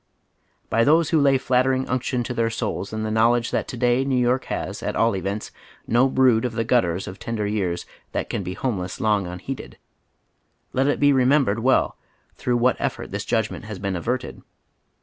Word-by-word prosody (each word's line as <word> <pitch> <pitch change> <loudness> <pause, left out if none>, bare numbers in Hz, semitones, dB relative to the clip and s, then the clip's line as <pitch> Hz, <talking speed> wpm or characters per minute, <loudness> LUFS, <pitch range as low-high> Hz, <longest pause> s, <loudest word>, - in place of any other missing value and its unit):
By 115 - +2
those 155 +4 +4
who 160 - +4
lay 140 -1 +4
flattering 130 0 +1
unction 125 -1 -1
to 125 - -4
tlieir 115 -1 0
souls 105 -3 -3
in 110 0 -3
tiie 110 0 -2
knowledge 115 +1 +3
that - - -1
to 125 - -6
day 120 +2 +2
New 135 -1 0
York 125 +1 +1
has, - - -4
at - - -3
all 115 -2 +2
events, 100 +3 -4 0.3
no 125 +3 +3
brood 130 -4 +4
of 125 -2 -2
the 115 0 -1
gutters 95 -7 +1
of 95 - -8
tender 115 -2 -3
years 95 -4 -2 0.3
that - - -2
can - - -3
be 90 - -5
homeless 95 -6 -3
long 105 -3 +1
unliceded, 90 +10 -7 1.0
let 135 +2 +2
it 145 - +1
be 145 0 +5
remembered 130 -4 +3
well 130 +3 +2 0.4
tlirough 120 -1 0
what 125 +2 +2
effort - - -3
this - - -4
judgment - - -1
has 105 -2 -6
been 100 0 -3
averted. 120 +9 -3
120 Hz, 190 wpm, -23 LUFS, 105-130 Hz, 1.0 s, be